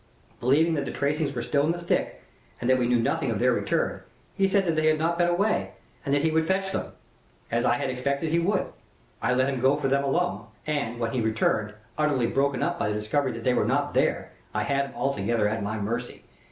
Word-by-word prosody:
Believing 150 +7 +3
that 140 -3 -1
the - - -4
tracings 145 +1 0
were 120 - -2
still 140 +3 +1
in 155 - +2
the - - -5
stick 170 0 -1 0.4
and 120 - -3
that 130 0 +4
we 120 - +1
knew 120 0 +3
nothing 115 - 0
of - - 0
their - - +3
return, - - -1 0.3
he 195 - +2
said 195 0 +2
that 165 -2 +1
they 155 0 +2
had 155 0 +4
not 170 +2 0
been 175 - +4
away, 200 +5 +1 0.3
and 140 - -3
that 145 +1 +2
he 160 - +2
would 160 0 +1
fetch 190 +1 0
them - - -4 0.6
as - - +1
I - - +3
had 130 - -2
expected 140 +4 -1
he 170 - +3
would. 190 +3 +1 0.6
I 125 - +1
let 130 +1 +2
him 135 -2 -1
go 135 +2 +4
for 145 -2 -1
them 140 +1 +2
alone, 175 +6 0 0.2
and, 140 -6 -2
when 115 -1 -1
he 125 - -1
returned, 110 -1 0 0.2
utterly 145 -5 +2
broken 135 +1 +1
up 175 0 -1
by - - 0
the 105 - -1
discovery 125 +6 0
that 115 0 -7
they 125 - +3
were - - +2
not 145 +6 0
there, - - +1 0.2
I 105 - +1
had 140 +4 0
him 135 - -13
altogether 115 -4 0
at 110 +1 -2
my 105 +2 -2
mercy. 115 +4 -4
140 Hz, 240 wpm, -26 LUFS, 120-160 Hz, 0.6 s, that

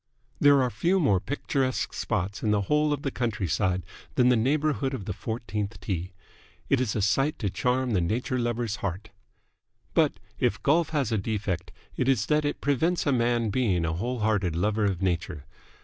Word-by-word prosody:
There 145 -2 +6
are 125 - 0
few 170 - +1
more 120 - +3
picturesque 130 +3 -1
spots 100 -1 -2
in 110 - 0
the 105 -1 +3
whole 150 +8 +2
of 145 -1 -2
the 140 - -1
countryside 95 - -1 0.3
than 125 0 +4
the 125 - +5
neighbourhood 140 +2 +1
of 100 - -7
the 105 - -3
fourteenth 105 -1 -4
tee. 90 -4 -3 0.6
It 135 -2 +3
is 120 -5 -1
a 105 - 0
sight 135 +8 +2
to 100 -4 -2
charm 125 +1 0
the 95 -5 +2
nature 120 +8 -1
lover's 120 -2 -1
heart. 100 +1 -4 0.8
But, - - +3 0.3
if - - 0
golf 160 +2 +3
has 145 -7 0
a 110 - +1
defect, 95 -4 -3 0.3
it 130 - +1
is 115 -5 +2
that 150 +2 +2
it 145 - -2
prevents 150 +5 +1
a 145 - +3
man 120 -3 +1
being 95 -9 +1
a 80 - -1
whole 120 +7 -3
hearted 100 -6 +1
lover 105 +4 +1
of 95 -2 -1
nature. 85 -4 -2
115 Hz, 185 wpm, -27 LUFS, 100-135 Hz, 0.8 s, There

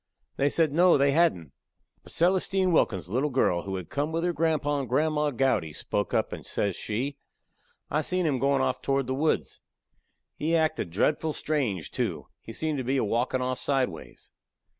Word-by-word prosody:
They 140 - +2
said, 160 0 +2
No, 175 +1 +5
they 140 0 +3
hadn't. 135 - +2 0.5
But - - -14
Celestine 185 +1 +2
Wilkin's 95 - +1
little 130 +10 0
girl, 125 -10 +1
who 95 -1 -3
had 90 -2 -7
come 145 +2 -1
with 165 +1 -1
her 175 0 +1
grandpa 155 -3 0
and 135 -4 -4
grandma 150 +3 +1
Gowdy, 120 - 0
spoke 105 +5 -2
up, - - 0
and - - -7
says 100 -3 -2
she: 130 +7 -3 0.7
"I 150 - +2
seen 180 +3 -1
him 140 -5 +1
goin' 140 +1 +2
off 130 -1 -1
toward 135 -1 0
the 130 - -2
woods. 150 +4 -1 0.8
He 160 +3 0
acted 155 - 0
dretful 150 - 0
strange, 115 - -2
too; - - -2 0.2
he - - -9
seemed 155 +4 -2
to - - -2
be 130 +3 0
a - - +1
walkin' 120 +4 0
off 130 0 -2
sideways." 135 -3 -3
140 Hz, 180 wpm, -27 LUFS, 120-155 Hz, 0.8 s, No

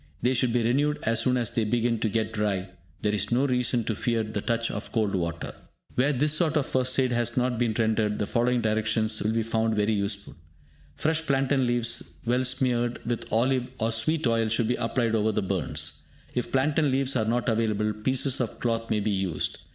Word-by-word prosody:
They 125 +2 +3
should 125 -1 +2
be 120 0 +1
renewed 145 +6 +2
as 115 0 +2
soon 125 +2 +2
as 120 -4 0
they 115 - 0
begin 115 +1 0
to 110 - 0
get 110 +1 -1
dry; 100 -3 -1 0.3
there 105 -1 +1
is 105 - -1
no 125 +4 +3
reason 125 -2 +1
to 110 - -1
fear 115 +2 0
the 110 -1 -4
touch 115 +1 0
of 105 - -5
cold 110 -4 0
water. 85 -2 -3 0.4
Where 135 +4 +2
this 145 +2 +2
sort 155 0 +2
of 145 - +1
first 130 0 0
aid 130 -1 +2
has 120 0 0
not 125 -1 +1
been 115 -3 +1
rendered, 110 -2 +1
the 105 - -1
following 120 +2 +1
directions 110 0 0
will 105 - +1
be 115 0 +1
found 110 0 0
very 105 +1 +1
useful. 100 0 -2 0.6
Fresh 160 +1 0
plantain 135 -1 +2
leaves 120 -1 -1
well 125 +2 +2
smeared 125 -2 +1
with 120 -1 -3
olive 125 +2 +2
or 115 0 0
sweet 155 +8 0
oil 115 -2 +2
should 115 +1 +1
be - - +3
applied 115 -1 0
over 110 0 +2
the 105 -1 -1
burns. 95 -6 -2 0.3
If 125 - -2
plantain 145 +3 +2
leaves 135 0 +1
are 110 -3 +1
not 120 +3 0
available, 110 -2 +1
pieces 130 +4 +1
of 115 - -4
cloth 115 -1 -1
may 110 -1 +1
be 105 +1 0
used. 95 -6 -2
115 Hz, 210 wpm, -26 LUFS, 110-125 Hz, 0.6 s, They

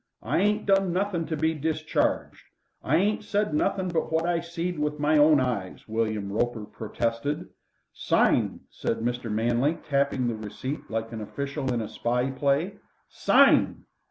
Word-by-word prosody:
I - - +1
ain't 210 +2 +1
done 195 -2 +3
nothing 180 -2 -1
to 160 0 -2
be 160 +1 +1
discharged. 155 +1 -1 0.4
I 145 - +2
ain't 210 +5 +2
said 205 -3 0
nothing 190 +4 +1
but 165 -2 -1
what 160 +1 +1
I 175 -1 +1
seed 170 0 -4
with 150 0 -1
my 150 +1 +3
own 150 0 +6
eyes," 120 -8 -3
William 110 -2 -1
Roper 115 -1 -1
protested. 115 +8 -3 0.4
"Sign!" - - +2
said - - -2
Mr. 120 0 -2
Manley, 120 +8 +1
tapping 140 -3 +1
the 120 - 0
receipt 110 +6 -6
like 115 +1 -3
an 115 -1 -5
official 140 +3 -3
in 120 -2 0
a 110 - -4
spy 120 +4 -1
play. 145 +8 0 0.3
"Sign!" - - +4
145 Hz, 155 wpm, -26 LUFS, 115-165 Hz, 0.4 s, own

